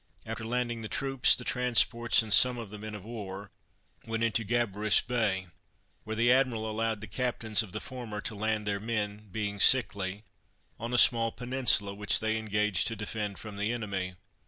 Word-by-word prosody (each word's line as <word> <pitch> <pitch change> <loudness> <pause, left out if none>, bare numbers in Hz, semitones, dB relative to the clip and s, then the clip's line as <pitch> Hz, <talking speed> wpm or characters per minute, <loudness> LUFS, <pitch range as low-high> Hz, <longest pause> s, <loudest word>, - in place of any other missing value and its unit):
After - - -5
landing 120 0 -2
the 110 - -5
troops, 135 +2 +2
the 125 - -6
transports, 120 -2 +2
and 110 -2 -2
some 125 -1 +6
of 115 -4 -7
the 105 - -7
men 110 0 -7
of 100 -1 -10
war, 100 -4 -7 0.5
went 115 0 -3
into 115 0 +1
Gabarus 110 -2 +2
Bay, 110 -6 -1 0.6
where 110 - -4
the 120 +2 +3
admiral 125 -4 +2
allowed 110 -1 -2
the - - -6
captains 115 -1 0
of 105 -4 -8
the 105 - -4
former 120 -5 -7
to - - -2
land 110 0 -2
their 100 -1 -1
men, 105 -1 -3
being 100 -1 -3
sickly, 100 -4 +3 0.6
on 115 +2 -4
a 125 - +1
small 115 -1 +5
peninsula, 120 -6 +1
which 105 +1 +1
they 110 0 0
engaged 105 -3 +1
to 115 - -2
defend 105 -1 -4
from 105 -2 -9
the 105 +3 -1
enemy. 100 -6 -4
110 Hz, 180 wpm, -29 LUFS, 105-120 Hz, 0.6 s, some